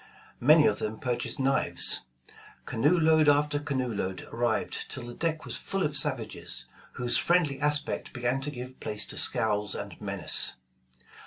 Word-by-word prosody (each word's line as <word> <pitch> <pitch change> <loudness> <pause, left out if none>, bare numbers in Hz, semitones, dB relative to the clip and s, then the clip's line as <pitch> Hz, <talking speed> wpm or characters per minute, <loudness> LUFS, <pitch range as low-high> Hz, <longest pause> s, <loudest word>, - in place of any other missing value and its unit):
Many 150 +4 +6
of 105 - +2
them 110 +1 -3
purchased 120 -1 -2
knives. 135 0 +1 0.6
Canoe 150 +10 +2
load 160 -1 +5
after 145 0 +2
canoe 130 -5 -2
load 95 -2 -3
arrived 120 +1 -1
till 130 - -6
the 120 - -8
deck 160 +3 -2
was - - -3
full 195 -1 -2
of 150 -1 -1
savages, 135 -5 -2 0.3
whose 120 -1 0
friendly 170 -6 +2
aspect 150 0 -1
began 125 +2 -1
to 140 - -3
give 130 -2 -8
place 105 0 -4
to - - -5
scowls 105 -2 +1
and - - -7
menace. - - +3
135 Hz, 155 wpm, -28 LUFS, 120-150 Hz, 0.6 s, Many